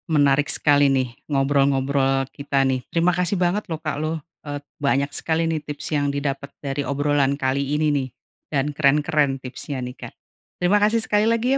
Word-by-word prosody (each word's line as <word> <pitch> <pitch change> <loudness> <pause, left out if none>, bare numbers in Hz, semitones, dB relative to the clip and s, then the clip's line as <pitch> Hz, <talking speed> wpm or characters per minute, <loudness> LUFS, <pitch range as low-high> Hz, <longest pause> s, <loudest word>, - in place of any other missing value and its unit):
menarik 145 0 +3
sekali 145 -1 +4
nih 130 -1 +1 0.2
ngobrol-ngobrol 135 -1 +2
kita 140 -1 -3
nih. 130 -1 +1
Terima 170 +1 +2
kasih 180 +2 0
banget 185 +4 +1
lho - - 0
Kak 155 -1 -3
loh, 155 +1 -1 0.3
et 145 -1 -5 0.2
banyak 140 0 +2
sekali 160 0 0
nih 160 -1 0
tips 150 0 -5
yang 145 -1 +1
didapat 140 0 -3
dari 140 0 -3
obrolan 140 -1 +1
kali 135 +1 0
ini 155 +1 +1
nih 135 -2 -1 0.4
dan 140 -2 +1
keren-keren 145 -1 +2
tipsnya 130 +2 -6
nih 125 - -7
Kak. - - -8 0.5
Terima 180 +3 +3
kasih 225 +2 +3
sekali 210 0 +2
lagi 230 +2 0
ya - - +2
145 Hz, 175 wpm, -22 LUFS, 135-155 Hz, 0.5 s, sekali